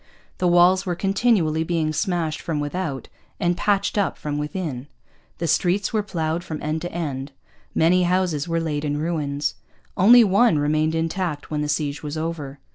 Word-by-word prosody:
The 180 - +2
walls 175 +2 +5
were 180 -3 -2
continually 195 -5 +1
being 160 -2 -1
smashed 160 -1 -1
from 160 -3 -2
without 145 -2 -3 0.3
and 175 -2 +1
patched 200 +2 +1
up 200 - 0
from 150 -1 -3
within. 150 -4 -4 0.5
The 170 - -3
streets 180 +6 +1
were 215 - +2
ploughed 165 -4 -2
from 155 -3 -5
end 155 +1 -2
to 175 - -5
end. 140 -5 -4 0.4
Many 175 +3 +4
houses 175 -4 +1
were 165 0 0
laid 155 -3 -2
in 145 -1 -1
ruins: 150 -3 -1 0.4
only 235 +6 +7
one 205 -1 +4
remained 155 +2 +1
intact 165 -2 -2
when 150 -1 -1
the 150 - -2
siege 145 -1 -1
was 150 +1 -5
over. 155 -4 -4
165 Hz, 170 wpm, -23 LUFS, 150-180 Hz, 0.5 s, only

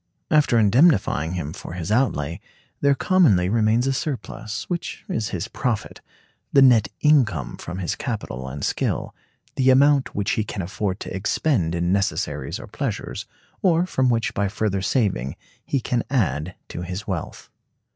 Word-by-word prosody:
After 150 -6 +4
indemnifying 105 - +3
him 80 -4 -4
for - - -8
his 90 +2 -4
outlay, 85 - +1 0.4
there 140 -1 +3
commonly 130 - +3
remains 115 +2 +2
a 135 - +1
surplus, 130 -6 -4
which 175 -2 -4
is 110 -3 -2
his 90 - -3
profit; 120 -5 -3 0.5
the 140 - +6
net 120 -5 +6
income 120 - +3
from 90 +2 -7
his 90 -3 -2
capital 100 - -4
[and 70 +2 -6
skill]; - - -1 0.4
the 130 0 +4
amount 140 +1 +4
which 100 -1 0
he 110 - +1
can 105 -3 -5
afford 95 +2 -3
to - - -5
expend 95 - 0
in 85 +1 0
necessaries 100 -1 -1
or - - -8
pleasures, - - -4 0.3
or 175 -2 +3
from 130 -8 +1
which 115 -1 0
by 100 -2 0
further 100 -1 -1
saving 95 - 0 0.3
he 140 - -1
can 120 0 -1
add 90 - 0
to - - -5
his 90 +4 -5
wealth. 95 -5 -5
105 Hz, 155 wpm, -23 LUFS, 90-130 Hz, 0.5 s, the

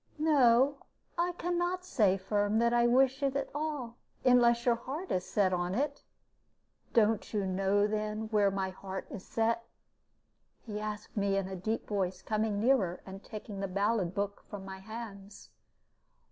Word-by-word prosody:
"No, 280 -3 +4 0.4
I 350 +1 0
can 350 0 -1
not 360 +1 -1
say, 205 - +3
Firm, 205 +2 0
that 235 +1 +3
I 240 0 +4
wish 265 +2 +3
it 275 -1 0
at 275 -1 -1
all; 290 -6 -3 0.3
unless 240 -2 +5
your 240 - +5
heart 270 +10 -5
is 180 - +1
set 190 -3 +2
on 175 +1 -1
it 285 +3 -1 0.4
" - - -40
"Don't 225 -1 +3
you 205 -2 +1
know, 195 +2 +2
then, 215 +1 -2
where 210 -2 +3
my 195 -1 -2
heart 190 0 -6
is 190 - -7
set?" 230 +1 0 1.0
he 210 -2 -4
asked 215 0 -6
me, 200 -2 +1
in 195 -1 -1
a 190 - -5
deep 215 +5 -3
voice, 190 -2 -2
coming 215 -1 0
nearer, 210 -7 +2
and 195 +1 -9
taking 210 -2 -7
the 195 - -2
ballad 200 -1 0
book 200 0 -2
from 200 -2 -7
my 190 0 -7
hands. 205 -1 -9
215 Hz, 170 wpm, -31 LUFS, 195-245 Hz, 1.0 s, unless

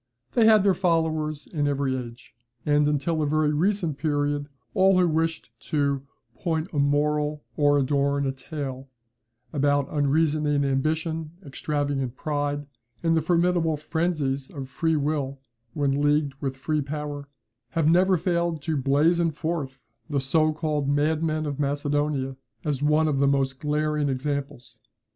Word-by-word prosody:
They 225 -2 +5
had 215 -3 +6
their 200 -1 +4
followers 160 -4 0
in 145 -3 -1
every 140 -2 0
age; 120 -3 -8 0.3
and 150 0 +3
until 150 +2 0
a 150 - +1
very 150 0 +2
recent 170 -2 0
period, 145 -1 0 0.2
all 190 0 +4
who 180 -1 +4
wished 160 0 -1 0.2
to 140 -2 +1 0.3
"point 160 +2 -2
a 145 - 0
moral 150 +1 +1
or 145 -1 +4
adorn 140 0 +1
a 135 - +1
tale" 135 -1 -6 0.6
about 145 -1 +2
unreasoning 145 0 +2
ambition, 155 +3 -1
extravagant 140 -2 -2
pride, 145 0 -2 0.4
and 165 -1 +3
the 160 - +3
formidable 170 -1 +2
frenzies 155 -4 -1
of 135 -3 -7
free 160 +3 0
will 145 -2 -1 0.4
when 140 -1 +1
leagued 145 -1 +2
with 135 -2 -3
free 150 +3 -1
power, 145 0 -5 0.5
have 160 -2 +3
never 180 +3 +4
failed 170 -3 -1
to 160 -1 -1
blazon 155 +5 +3
forth 150 -3 -3 0.3
the 145 -2 0
so 155 +4 +2
called 150 -2 -1
madman 155 +2 +1
of 145 -1 -4
Macedonia 145 -1 -1 0.3
as 145 -3 -1
one 150 +2 +3
of 145 -3 0
the 140 - +4
most 135 -1 +1
glaring 150 -1 0
examples. 135 -4 -4
150 Hz, 145 wpm, -25 LUFS, 140-160 Hz, 0.6 s, had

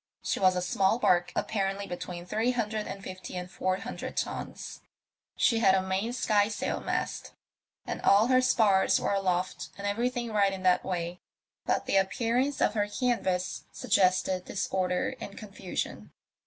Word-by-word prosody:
She - - -1
was 185 -1 +4
a 180 - -1
small 190 +4 +2
barque, 175 -7 +2
apparently 195 -1 -1
between 175 -1 -6
three 220 +6 0
hundred 215 -3 -2
and 195 - -7
fifty 185 -1 -7
and 180 0 -6
four 185 0 0
hundred - - -6
tons; - - -4 0.5
she 230 - +3
had 195 -4 +5
a 190 - +2
main 190 +5 -1
skysail 210 -4 +1
mast, - - -3 0.5
and - - -4
all 200 +2 +5
her 255 +1 +4
spars 215 -6 +4
were - - 0
aloft 185 -2 -1
and 200 - -6
everthing 235 +3 -1
right 200 -2 +3
in 190 -1 -6
that 180 -1 +4
way; 175 -1 -3 0.5
but - - +1
the - - +2
appear 225 +5 +1
ance 275 +2 0
of - - +3
her 205 -2 +1
canvas 205 -6 -1
suggested 185 0 +2
disorder 185 -2 -1
and 200 - -8
confusion. 195 -4 -5
195 Hz, 160 wpm, -29 LUFS, 185-220 Hz, 0.5 s, had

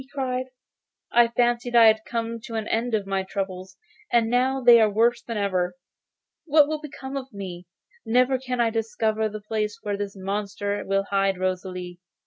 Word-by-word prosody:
he 260 - -14
cried. 260 -2 -3 0.6
'I 240 0 +5
fancied 240 0 +1
I 230 -1 +8
had 220 0 +5
come 230 0 -3
to 230 -3 -7
an 220 -1 -2
end 230 +1 0
of 205 -2 -2
my 195 0 -1
troubles, 190 -1 -5 0.3
and 230 -1 +3
now 260 +2 +2
they 240 -2 +7
are 215 - +4
worse 235 +3 +2
than 230 -2 -5
ever. 185 -3 0 0.7
What 300 -2 +5
will 310 0 -3
become 275 -2 -8
of 270 -1 -5
me? 185 -4 -8 0.4
Never 255 +3 +2
can 250 -1 -4
I 230 -1 +3
discover 220 -1 -1
the 215 0 -7
place 210 0 -2
where 205 -1 -2
this 205 -1 -5
monster 200 +1 -3
will 195 0 +1
hide 195 -1 +2
Rosalie. 180 -1 -4
220 Hz, 180 wpm, -25 LUFS, 195-245 Hz, 0.7 s, I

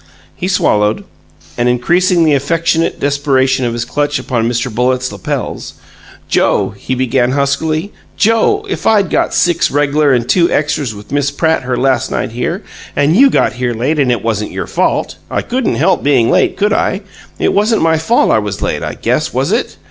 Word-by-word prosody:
He 185 - -3
swallowed, 105 - +1 0.6
and, 120 +1 +2
increasing 170 +8 +2
the 155 - +3
affectionate 165 +3 0
desperation 135 -2 +1
of 120 - -1
his 120 0 -3
clutch 145 +3 -1
upon 115 -3 -1
Mr. 120 0 -2
Bullitt's 125 +2 0
lapels, 100 -2 -5 0.5
"Joe," - - +1
he 130 +6 -4
began, 130 0 +1
huskily 155 +6 -1 0.2
"Joe, 230 - +2
if 390 - -3
I'd 205 -5 +3
got - - +1
six 175 -1 +2
reg'lar 145 0 +2
and 120 -2 +1
two 170 +3 +3
extras 145 -6 -1
with 105 +3 -12
Miss 140 -1 +1
Pratt 160 +3 0
her 125 -1 -2
last 135 +1 +1
night 125 - -3
here, 165 - -3 0.3
and 145 +3 +2
you 275 +6 +6
got - - +1
here 120 -1 -2
late, 140 +7 -1
and 130 -3 +2
it 120 -5 -1
wasn't 110 -2 -1
your - - -4
fault - - -1
I - - -2
couldn't 255 -1 -1
help 180 +5 +2
being 130 -5 +2
late, - - +2
could 205 +1 +1
I? 195 - 0 0.4
It - - 0
wasn't 210 -1 +2
my 160 -1 +2
fault 230 +10 +2
I - - +3
was 105 -3 -4
late, - - -1
I - - -4
guess, - - -1
was - - 0
it? - - -1
140 Hz, 185 wpm, -14 LUFS, 125-170 Hz, 0.6 s, you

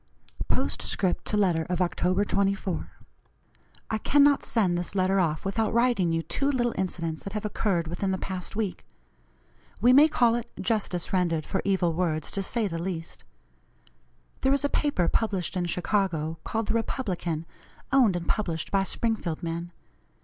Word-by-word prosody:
POSTSCRIPT 185 -3 0
TO 210 - 0
LETTER 180 -5 +2
OF 180 - 0
OCT. 180 +3 +1
24. 195 -2 0 1.0
"I 220 - 0
cannot 285 +3 +4
send 195 -7 +1
this 175 +2 -2
letter 190 +1 +2
off 160 -2 0
without 215 +3 0
writing 235 -8 +3
you 165 0 0
two 275 - -1
little 240 -4 +1
incidents 170 -4 -3
that 195 - -6
have 210 -1 -3
occurred 195 -5 0
within 175 +4 -2
the 190 - 0
past 185 -1 -5
week. 210 -4 -2 1.0
We 245 +4 +5
may 290 +4 +8
call 240 -6 +3
it 235 0 -3
justice 200 -7 -1
rendered 170 -4 +1
for 190 - -1
evil 190 -4 +1
words, 160 -3 -1
to 195 - 0
say 220 +2 0
the 165 -3 -4
least. 170 -2 -5 1.2
There 265 - +3
is 280 +1 +1
a - - +1
paper 280 - +1
published 195 -4 0
in 180 -1 0
Chicago 170 -3 -1
called 225 -1 -2
the - - +2
Republican, 180 - -2 0.5
owned 250 -9 +5
and 175 -1 -4
published 170 -7 -1
by 195 - +3
Springfield 195 -5 -1
men. 170 +1 -4
190 Hz, 160 wpm, -27 LUFS, 175-220 Hz, 1.2 s, may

